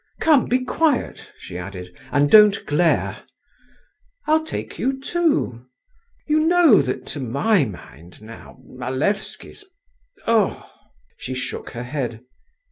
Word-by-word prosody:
Come, 305 -6 +3
be 255 +1 0
quiet," 305 -3 -1
she 90 - -8
added, 90 -1 -9 0.2
"and 145 0 +2
don't 210 -2 +6
glare. 160 +3 0 1.0
I'll 315 +1 +2
take 315 - -6
you 265 +1 -1
too. 270 - -1 0.6
You 305 0 +2
know 325 - +5
that 130 -2 -4
to 145 - -6
my 140 - +1
mind 85 - -12
now 110 +4 -13
Malevsky's—ugh!" 230 - -3 0.5
She 130 - -6
shook 130 - -5
her 120 0 -5
head. 125 -4 -4
195 Hz, 115 wpm, -21 LUFS, -, 1.0 s, don't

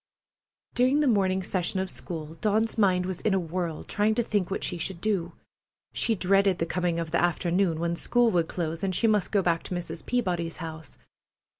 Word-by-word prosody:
During 260 +4 +3
the 295 - +2
morning 190 -5 +2
session 185 +1 -1
of 190 - -1
school 160 -4 -7
Dawn's 215 +6 0
mind 185 -4 +3
was 185 -1 -4
in 210 -3 +2
a - - +2
whirl, 170 -1 -3
trying 215 +1 +1
to 240 - +1
think 205 -5 0
what 195 - -3
she 175 - -2
should 175 +1 -4
do. 180 -4 -1 0.6
She 230 - +1
dreaded 195 0 +3
the 165 - 0
coming 175 -1 -1
of 165 -1 -4
the 170 - +2
afternoon, 175 0 +1
when 170 0 0
school 240 +6 +2
would 170 -4 +1
close, 165 -1 -3
and 190 -2 0
she 230 - +1
must 210 -3 +2
go 200 -2 +2
back 170 -2 +1
to 180 - -5
Mrs. 170 -1 -5
Peabody's 175 -9 -1
house. 160 -3 -8
180 Hz, 200 wpm, -27 LUFS, 170-205 Hz, 0.6 s, During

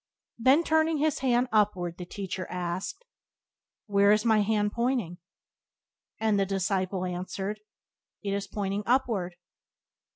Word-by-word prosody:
Then, 265 +7 +5
turning 320 0 +2
His 305 0 +1
hand 250 -1 +2
upward, 190 -5 +1
the 180 - -6
Teacher 185 -1 -5
asked: 180 - -4 0.8
"Where 200 -1 +3
now - - +8
is 215 +2 -2
my 220 -2 +4
hand 210 0 +1
pointing?" 235 -8 -1 1.0
And 220 -2 +2
the 195 - +2
disciple 190 -1 -1
answered: 190 +3 -4 0.6
"It 200 - -2
is 200 0 -2
pointing 200 0 -2
upward." 225 -8 +1
205 Hz, 130 wpm, -28 LUFS, 185-235 Hz, 1.0 s, now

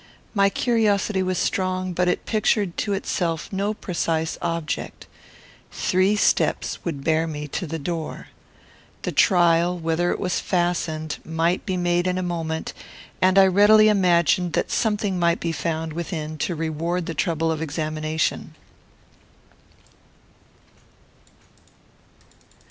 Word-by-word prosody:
My 200 -2 +4
curiosity 210 -3 +1
was 185 -1 -1
strong, 185 -1 -1
but 180 +1 +1
it 180 - 0
pictured 210 -4 +1
to 205 - -1
itself 175 -3 -2
no 200 +2 0
precise 165 -4 -2
object. 165 -3 -3 0.7
Three 185 +3 +1
steps 205 - +1
would 145 -5 -4
bear 160 +1 +1
me 150 -2 -5
to 175 +5 -4
the 165 +2 -4
door. 160 +1 -5 0.7
The - - -2
trial, 175 -2 +3
whether 165 +1 0
it - - -1
was 180 -2 -1
fastened, 170 -3 -1
might 165 +5 -1
be 185 -2 -1
made 175 0 +1
in 180 0 0
a 185 - -1
moment; 165 -2 -3 0.5
and 185 +1 +4
I 195 - +8
readily 205 +3 +6
imagined 180 -3 +3
that - - -1
something 210 -4 0
might 170 -1 +2
be 170 - -2
found 160 -1 -3
within 155 -2 -5
to 175 - -1
reward 165 +2 -2
the 165 - -4
trouble 165 0 0
of 160 -1 -3
examination. 155 0 -2
175 Hz, 125 wpm, -23 LUFS, 160-185 Hz, 0.7 s, I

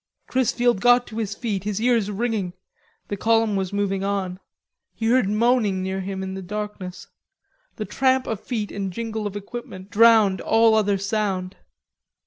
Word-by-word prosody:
Chrisfield 245 -4 +1
got 245 +1 +5
to 220 0 -7
his 205 -2 -3
feet, 205 -6 -3
his 210 0 -2
ears 230 -3 +2
ringing. 210 -3 -2 0.6
The 205 - -3
column 225 0 +2
was 190 -2 -1
moving 200 -1 -1
on. 195 -2 -2 0.6
He 225 - -4
heard 235 -3 +3
moaning 210 -3 +2
near 190 0 -2
him 190 0 -4
in 190 0 -4
the 190 - -5
darkness. 200 -1 -6 0.7
The - - -4
tramp 260 -1 +2
of 220 - -3
feet 220 -5 -4
and 195 -2 -3
jingle 220 +1 -3
of 205 - -7
equipment 205 -2 -8
drowned 215 -4 +5
all 225 0 +4
other 205 -2 +2
sound. 195 -2 -2
210 Hz, 160 wpm, -23 LUFS, 195-230 Hz, 0.7 s, got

